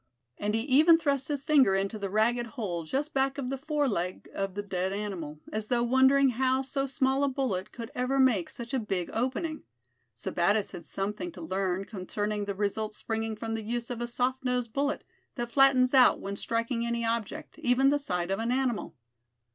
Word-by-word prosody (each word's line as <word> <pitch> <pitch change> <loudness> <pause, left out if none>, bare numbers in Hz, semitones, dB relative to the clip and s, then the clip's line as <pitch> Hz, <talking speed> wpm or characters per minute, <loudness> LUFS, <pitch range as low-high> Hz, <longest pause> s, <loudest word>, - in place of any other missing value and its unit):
And 210 +1 0
he 225 - +1
even 300 +6 +6
thrust 280 -4 0
his 285 -2 -2
finger 270 -11 +5
into 195 +3 -1
the 200 -1 -3
ragged 235 +4 +2
hole 175 -8 -3
just 285 - -2
back 270 0 +1
of 265 -2 -3
the 270 - -2
fore 300 0 0
leg 185 -5 -2
of 195 -1 -3
the 205 - -3
dead 190 -1 -2
animal, 190 -7 -4
as 215 0 -3
though 240 0 +2
wondering 265 +2 +5
how 260 +2 +1
so 275 +1 -1
small 265 +1 +1
a - - +3
bullet 255 -9 -2
could 230 -2 -8
ever 250 +2 0
make 240 -10 +3
such 235 +2 -8
a 265 - +2
big 195 -6 -3
opening. 265 +7 -2 0.5
Sebattis 195 - 0
had 170 - -8
something 195 -2 -3
to 175 - -10
learn 185 +2 -1
concerning 205 +1 -3
the 200 -1 -3
results 210 +2 -2
springing 225 0 -2
from 225 +1 -4
the 225 - -2
use 235 +2 -3
of 240 -1 -4
a 240 - -1
soft 255 +2 -1
nosed 250 -3 -1
bullet, 285 +1 0 0.3
that 240 -2 -4
flattens 270 -1 +5
out 260 -2 +6
when 200 0 -4
striking 230 +3 -1
any 235 0 -1
object, 235 +8 -3
even 270 -1 +3
the 290 - +2
side 180 -9 -2
of 195 - 0
an 230 +2 -1
animal. 255 -3 -1
235 Hz, 200 wpm, -29 LUFS, 200-265 Hz, 0.5 s, even